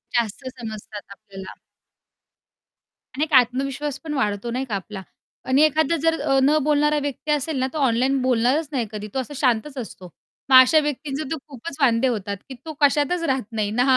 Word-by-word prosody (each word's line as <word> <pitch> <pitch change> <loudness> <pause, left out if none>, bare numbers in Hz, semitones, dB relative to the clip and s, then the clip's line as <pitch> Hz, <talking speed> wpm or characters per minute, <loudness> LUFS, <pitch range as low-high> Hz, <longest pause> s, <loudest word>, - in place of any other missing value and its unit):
जास्त 230 +1 -1
समजतात 215 -3 -8
आपल्याला. 195 -2 -11 1.6
आणि 295 - 0
एक 315 - -4
आत्मविश्वास 270 +3 +2
पण 310 -2 -6
वाढतो 215 -2 -1
नाही 260 +2 -2
का 215 -5 -3
आपला. 195 0 -6 0.5
आणि 265 +3 +3
एखादा 310 +1 +2
जर 325 0 +1
अ, 270 0 +2
न 300 +3 +4
बोलणारा 295 0 +2
व्यक्ती 290 +2 -3
असेल 295 0 -1
ना, 260 - +1
तो - - -4
ऑनलाईन 255 +3 +1
बोलणारच 255 +5 +1
नाही 245 -6 -1
कधी 210 0 -6
तो 265 - -1
असा 275 +3 -5
शांतच 265 +1 0
असतो. 190 -6 -8 0.4
मग 260 - +6
अशा 310 +5 +4
व्यक्तींचा 295 0 -3
तर 320 - -1
खूपच 275 +2 -8
वांदे 245 0 +3
होतात, 200 -4 -2
की - - -6
तो 315 - -6
कशातच 295 +4 +2
राहत 250 -5 -3
नाही 210 -2 -2
ना 245 +3 +2
260 Hz, 180 wpm, -22 LUFS, 225-295 Hz, 1.6 s, मग